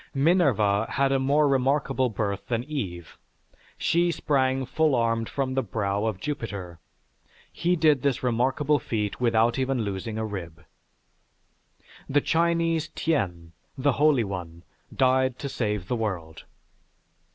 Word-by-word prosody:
Minerva 135 - +3
had 140 -1 +2
a 135 - +2
more 145 +3 +3
remarkable 135 -1 +1
birth 100 -3 -3
than 120 -1 -1
Eve; 95 - -6 0.6
she 175 +1 +2
sprang 135 -4 0
full 155 +2 +1
armed 115 -1 0
from 135 -2 -2
the 135 - +1
brow 100 -2 -2
of 110 -4 -2
Jupiter. 100 - -5 0.7
He 175 +1 +1
did 155 -5 +3
this 140 -2 0
remarkable 130 +5 +1
feat 105 -2 -3
without 115 0 +2
even 130 -2 0
losing 100 +2 -4
a 110 - -2
rib. 85 -6 -7 1.4
The 145 - +4
Chinese 165 0 +1
Tien, 90 - -1 0.3
the 140 +2 +2
holy 145 -2 +3
one, 90 -4 -6 0.3
died 130 -1 +2
to 140 - -5
save 105 -8 -2
the 125 - -1
world. 90 -8 -4
125 Hz, 130 wpm, -26 LUFS, 105-140 Hz, 1.4 s, The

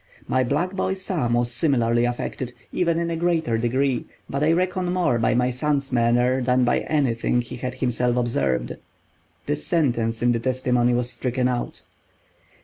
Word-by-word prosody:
My 130 - +2
black 150 +9 0
boy 190 0 -1
Sam 165 -11 -1
was 120 0 0
similarly 120 -3 +2
affected, 120 +1 -3 0.2
even 170 -2 +1
in 170 0 -1
a - - -1
greater 165 -8 0
degree, 130 +2 0 0.2
but 140 +2 -2
I 155 - +4
reckon 180 +1 0
more 175 -10 +1
by 115 - +2
my 125 +1 +2
son's 140 +1 -1
manner 120 +2 +2
than 125 0 +2
by 120 - +2
anything 125 -5 0
he 120 +1 -8
had 125 +1 -4
himself 125 -1 0
observed. 70 - 0 0.7
[This 150 +1 -3
sentence 120 -9 0
in 120 - +4
the 115 - 0
testimony 125 -1 +1
was 120 0 -1
stricken 125 0 -1
out. 125 -1 -3
125 Hz, 165 wpm, -23 LUFS, 120-150 Hz, 0.7 s, I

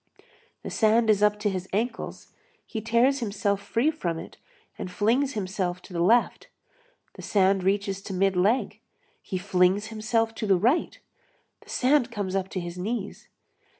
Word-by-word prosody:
The - - -6
sand 220 0 +3
is 205 -1 +1
up 210 0 +3
to 210 - +1
his 185 0 -5
ankles, 225 +5 -3 0.3
he 220 - -5
tears 235 +5 +2
himself 200 -3 -1
free 230 +9 +1
from 175 - -3
it - - -9 0.4
and - - -6
flings 235 +9 +1
himself 185 -3 -2
to - - -13
the 170 - -1
left, 230 +7 +2 0.7
the - - -11
sand 195 -1 +2
reaches 195 0 0
to 195 - -5
mid 195 +1 +2
leg, 205 +8 +1 0.4
he 185 - -4
flings 185 +1 +2
himself 225 +1 0
to 220 -1 -4
the 195 -2 +4
right, 245 - +1 0.6
the - - -20
sand 260 0 +2
comes 200 -4 -3
up 190 -1 -1
to 185 - -3
his 175 0 -6
knees. 225 +6 -4
205 Hz, 165 wpm, -26 LUFS, 190-230 Hz, 0.7 s, the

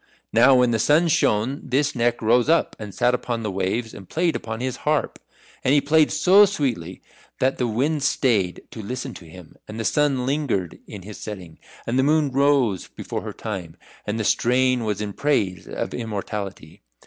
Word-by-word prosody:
Now 125 +4 +6
when 125 -1 +4
the 115 - +1
sun 155 +8 +3
shone 125 -1 +1
this 135 +2 0
Neck 120 -1 0
rose 120 +5 +3
up 165 - +2
and 105 -2 -7
sat 125 +3 +1
upon 120 -2 -2
the 105 - -2
waves 100 +5 -2
and 95 - -12
played 170 0 0
upon 110 0 -5
his 130 0 -3
harp. 150 0 -1 0.4
And 135 - +3
he - - +6
played 150 +2 +3
so 185 +7 +6
sweetly 120 - -3 0.3
that 130 +1 0
the 125 - +1
winds 140 +6 0
stayed 105 -9 +1
to 110 - -7
listen 125 +4 -5
to 85 - -12
him, 80 0 -13
and 110 +1 -7
the 115 - -3
sun 140 -4 +1
lingered 130 - -1
in 100 -3 -9
his 105 +2 -10
setting, 95 -6 -8 0.3
and 125 +3 0
the - - +4
moon 150 0 +2
rose 135 -7 +2
before - - -6
her - - -6
time. 95 -7 -6 0.3
And 105 +2 -2
the - - -1
strain 125 +2 +2
was 105 -1 -2
in 105 -1 -4
praise 100 -12 -1
of - - -4
immortality. 100 -6 -6
120 Hz, 190 wpm, -23 LUFS, 105-140 Hz, 0.4 s, Now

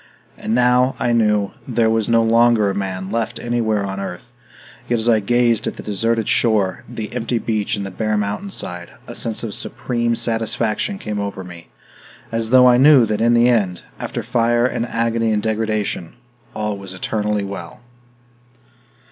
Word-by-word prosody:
And 110 - -2
now, 125 +1 +3
I 120 - +1
knew, 105 -3 +2 0.2
there 115 -3 +2
was 110 -2 0
no 115 0 +4
longer 115 -2 +4
a - - -5
man 95 -1 -4
left 115 0 -2
anywhere 110 -4 0
on 95 0 -4
earth; 100 +4 -7 0.6
yet 120 - +2
as 110 +1 -1
I 115 -2 +4
gazed 115 +1 +1
at - - -3
the - - -9
deserted 115 +2 -1
shore, 105 -6 +2
the 115 -3 -6
empty 115 +1 -1
beach 110 0 -1
and 100 -1 -4
the 95 - -6
bare 110 +2 -1
mountainside, 100 - -4 0.2
a - - -8
sense 115 0 -4
of 110 -3 -4
supreme 120 0 -1
satisfaction 115 - -1
came 105 - -4
over 100 -2 -4
me, 85 -2 -11 0.6
as 115 -1 -1
though 125 0 +7
I 125 -1 +6
knew 135 -2 +7
that 105 0 -2
in 120 +1 +4
the 120 +1 +5
end, 100 -7 +1 0.2
after - - -4
fire 120 0 +2
and 120 -1 -1
agony 115 -1 0
and 105 -1 0
degradation, 110 -4 -2 0.4
all 105 -2 -2
was 95 -1 -8
eternally 105 +1 -1
well. 100 +1 -7
110 Hz, 175 wpm, -19 LUFS, 105-120 Hz, 0.6 s, though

